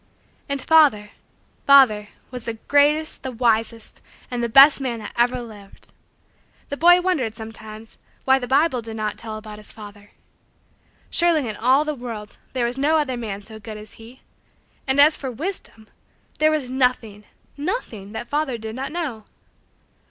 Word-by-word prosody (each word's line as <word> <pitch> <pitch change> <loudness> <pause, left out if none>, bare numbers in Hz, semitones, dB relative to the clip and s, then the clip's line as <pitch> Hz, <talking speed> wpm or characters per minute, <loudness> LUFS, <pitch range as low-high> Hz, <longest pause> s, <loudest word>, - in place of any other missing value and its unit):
And 280 0 -1
father 270 -10 +4 0.6
father 250 -7 +6 0.2
was 250 -3 -6
the 230 - -4
greatest, 290 +6 +1
the 260 - -5
wisest, 230 -1 -1 0.3
and 245 -1 -2
the 235 - -1
best 275 +4 +7
man 245 -3 -2
that 215 - -9
ever 245 +1 +2
lived. 210 -4 -12 0.8
The 285 - -3
boy 350 +3 +6
wondered, 285 -12 -1
sometimes, 220 -1 -10 0.3
why 265 0 +4
the 245 - -5
Bible 275 -1 +2
did 225 -1 -8
not 215 -1 -3
tell 220 -1 -5
about 215 -1 -10
his 210 - -4
father. 205 -1 -13 1.0
Surely, 335 -6 +2
in 215 - -4
all 260 +7 +3
the 305 - -2
world, 230 -5 -8
there 250 -2 0
was 245 +3 -2
no 305 +3 +3
other 285 -4 -1
man 210 -4 -6
so 220 +1 -11
good 215 0 -8
as 215 0 -12
he. 240 +4 -14 0.7
And, 265 +1 +1
as 300 +2 +6
for 270 - -5
wisdom! 250 - -5 0.5
There 310 - +4
was 305 -4 -1
nothing 250 -5 -1 0.3
nothing 285 - -5
that 240 +2 -6
father 290 -3 -1
did 220 0 -7
not 265 +2 -5
know! 290 -11 -5
245 Hz, 165 wpm, -22 LUFS, 220-285 Hz, 1.0 s, best